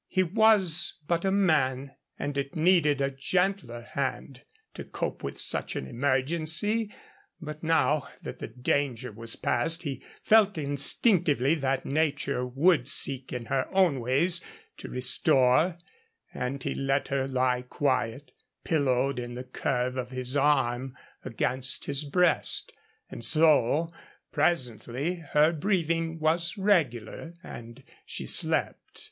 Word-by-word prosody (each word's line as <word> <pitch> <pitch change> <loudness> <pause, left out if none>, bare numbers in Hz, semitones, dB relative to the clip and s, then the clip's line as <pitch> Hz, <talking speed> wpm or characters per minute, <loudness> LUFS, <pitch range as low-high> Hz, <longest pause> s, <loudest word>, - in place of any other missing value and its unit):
He 185 - +1
was 190 -3 +3
but 170 -1 0
a - - +3
man, 140 -9 +1 0.3
and 145 - -4
it 140 0 -3
needed 155 -4 +3
a 135 0 0
gentler 140 -4 -1
hand 135 0 -4 0.3
to - - -7
cope - - -5
with 70 - -6
such - - -3
an - - -3
emergency; 155 - -1 0.5
but 155 -2 -8
now 160 -2 +1 0.2
that - - -7
the - - -5
danger 125 -1 -2
was 115 +2 -6
past 165 +8 0
he 135 -5 -5 0.2
felt 210 -4 +4
instinctively 145 - +2
that 135 -4 -1
nature 140 -3 0
would 135 +2 +2
seek 135 -2 -2
in 125 -2 -5
her 130 +3 -1
own 185 -8 +3
ways 140 +9 +1 0.4
to - - -9
restore, 130 +5 +3 0.6
and 130 +2 -4
he - - -2
let 135 +1 -1
her 135 -1 0
lie 130 -1 +1
quiet, 125 0 -2 0.3
pillowed 135 -4 +1
in 120 0 -6
the 125 - -6
curve 125 0 -2
of 125 -1 -3
his 130 +1 -5
arm 135 -3 +1 0.3
against 130 +1 -2
his 140 +1 -1
breast. 175 +4 +1 0.4
And - - -8
so, 155 +3 +3 0.4
presently, 130 - -1 0.2
her 150 +2 +5
breathing 165 -2 -1
was 165 +4 0
regular, 165 - 0
and 115 -6 -10 0.2
she - - -5
slept. - - 0
140 Hz, 130 wpm, -27 LUFS, 125-165 Hz, 0.6 s, her